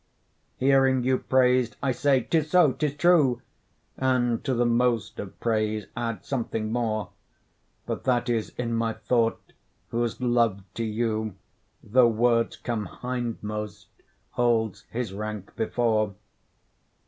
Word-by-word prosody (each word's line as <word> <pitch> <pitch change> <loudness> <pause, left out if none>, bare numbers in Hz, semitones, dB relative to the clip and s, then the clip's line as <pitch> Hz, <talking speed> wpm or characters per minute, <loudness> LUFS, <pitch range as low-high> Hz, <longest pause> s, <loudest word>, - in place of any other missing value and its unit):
Hearing 135 -1 +3
you 130 0 +2
praised, 125 -2 +2
I 135 - +2
say 135 +1 +2
''tis 160 +2 +1
so, 175 -4 +5
'tis 150 -2 -2
true,' 145 -7 +3 0.5
And 125 -3 +1
to 130 - 0
the 120 +1 +2
most 120 -1 +1
of 100 - -8
praise 110 -2 0
add 115 -1 -3
something 115 -4 -2
more; 110 -3 -1 0.7
But - - -4
that 125 -1 +2
is 115 -3 0
in 120 -1 -2
my 115 0 0
thought, 115 +1 -1 0.4
whose 120 -1 -1
love 120 -5 +1
to 115 - -3
you, 110 -2 -1 0.5
Though 125 +3 +5
words 115 +1 +2
come 115 -5 -3
hindmost, 115 -3 -5 0.4
holds 115 -4 0
his 115 -4 -3
rank 105 -1 -6
before. 110 -3 0
120 Hz, 125 wpm, -26 LUFS, 110-125 Hz, 0.7 s, so